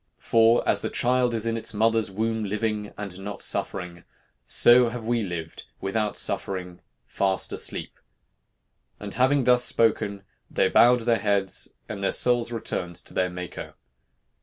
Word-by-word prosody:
For 115 +1 +3
as - - +2
the - - -2
child 125 0 +1
is 115 0 -3
in 115 0 -1
its 115 -1 -3
mother's 115 0 +2
womb 110 +3 -2
living 105 0 -2
and 100 -3 -7
not 100 +1 -6
suffering, 85 -3 -4 0.4
so 120 0 +5
have 115 -1 -7
we 120 0 +1
lived 85 -5 -6
without 105 +2 -2
suffering, 90 -2 -3 0.2
fast 95 -1 0
asleep.' - - -2 1.0
And 105 -1 -7
having 130 +2 +3
thus 125 0 +4
spoken, 105 -4 +1 0.3
they - - +1
bowed 125 0 +5
their 115 -1 +2
heads, 100 -2 -1 0.2
and 100 -2 -6
their 100 - +1
souls 120 -1 +1
returned 90 -6 -4
to - - -11
their 90 0 +1
Maker. 90 -1 -8
110 Hz, 150 wpm, -25 LUFS, 95-115 Hz, 1.0 s, so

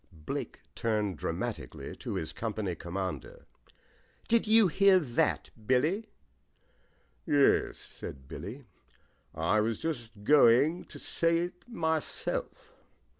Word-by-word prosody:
Blake - - -4
turned 105 -4 0
dramatically - - -4
to - - -5
his 80 -4 -3
company 105 -4 -3
commander. 90 +3 -5 0.8
"Did 230 -1 +3
you 220 -1 +6
hear 195 +3 +5
that, 135 -10 0 0.2
Billy?" 155 - +2 1.2
he 155 - 0
asked. 140 -1 +5
"Yes," - - -12
said 65 -1 -9
Billy. 105 - -8 0.7
"I 85 +7 +2
was 110 +1 0
just 120 -10 -5
going 145 +5 +5
to - - -12
say 165 0 +1
it 175 +1 -3
myself." 160 -8 -3
125 Hz, 115 wpm, -30 LUFS, 105-165 Hz, 1.2 s, you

